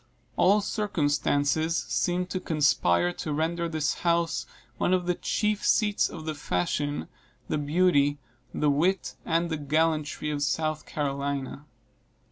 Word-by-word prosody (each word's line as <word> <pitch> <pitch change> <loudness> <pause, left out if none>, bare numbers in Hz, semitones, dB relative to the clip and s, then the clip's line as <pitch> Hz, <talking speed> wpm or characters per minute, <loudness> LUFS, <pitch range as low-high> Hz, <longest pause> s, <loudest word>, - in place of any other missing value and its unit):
All 205 +3 +4
circumstances 160 -5 0
seemed 180 0 -1
to 185 - -1
conspire 90 - +2
to 155 - -5
render 165 +3 -1
this 155 -3 0
house 170 -1 +1 0.3
one 185 - +3
of 180 -1 -2
the 180 - +2
chief 210 +3 -1
seats 210 -2 +2
of 160 -2 -8
the 155 - -2
fashion, 145 +4 -2 0.4
the 155 - 0
beauty, 145 -2 +2 0.3
the 150 -1 +1
wit, 175 +7 +1
and 170 0 +1
the 160 - -1
gallantry 150 0 0
of 145 -1 -3
South 155 +2 -1
Carolina. 140 0 -3
155 Hz, 130 wpm, -27 LUFS, 145-175 Hz, 0.4 s, All